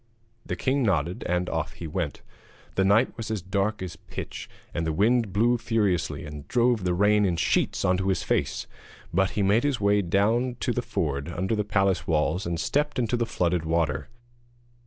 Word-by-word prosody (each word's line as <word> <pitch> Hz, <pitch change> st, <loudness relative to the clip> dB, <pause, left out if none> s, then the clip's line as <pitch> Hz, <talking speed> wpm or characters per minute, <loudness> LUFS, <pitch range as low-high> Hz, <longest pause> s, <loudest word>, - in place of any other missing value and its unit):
The -, -, -3 dB
king 135 Hz, +1 st, 0 dB
nodded, 95 Hz, -5 st, 0 dB
and 90 Hz, +1 st, +1 dB
off 80 Hz, -1 st, -2 dB
he 85 Hz, -, -8 dB
went. 80 Hz, -1 st, -3 dB, 0.5 s
The 95 Hz, -, +2 dB
night 105 Hz, +6 st, +3 dB
was 115 Hz, -2 st, -5 dB
as 110 Hz, -5 st, -2 dB
dark 100 Hz, +1 st, -1 dB
as 90 Hz, -, -6 dB
pitch, -, -, -7 dB, 0.2 s
and 85 Hz, -, -1 dB
the -, -, +1 dB
wind 110 Hz, +5 st, +2 dB
blew 115 Hz, +5 st, +2 dB
furiously 105 Hz, -9 st, 0 dB
and 75 Hz, -1 st, -8 dB
drove 120 Hz, -3 st, +2 dB
the 90 Hz, -1 st, +1 dB
rain 105 Hz, +2 st, +4 dB
in 90 Hz, -4 st, +2 dB
sheets 80 Hz, -, +1 dB
into 95 Hz, +1 st, +1 dB
his 95 Hz, -, +1 dB
face; -, -, -1 dB, 0.5 s
but 95 Hz, +1 st, +3 dB
he 105 Hz, -, +2 dB
made 105 Hz, +4 st, +3 dB
his 145 Hz, -4 st, 0 dB
way 100 Hz, 0 st, +3 dB
down 110 Hz, +7 st, +1 dB
to 120 Hz, -, 0 dB
the 125 Hz, -, -1 dB
ford 75 Hz, -, -2 dB
under 95 Hz, +5 st, -1 dB
the 105 Hz, -, 0 dB
palace 95 Hz, -4 st, +1 dB
walls 80 Hz, +2 st, +1 dB
and 85 Hz, -1 st, -2 dB
stepped 150 Hz, +8 st, 0 dB
into 120 Hz, -1 st, +1 dB
the 120 Hz, -1 st, 0 dB
flooded 90 Hz, -4 st, 0 dB
water. 80 Hz, -3 st, 0 dB
95 Hz, 190 wpm, -26 LUFS, 85-115 Hz, 0.5 s, rain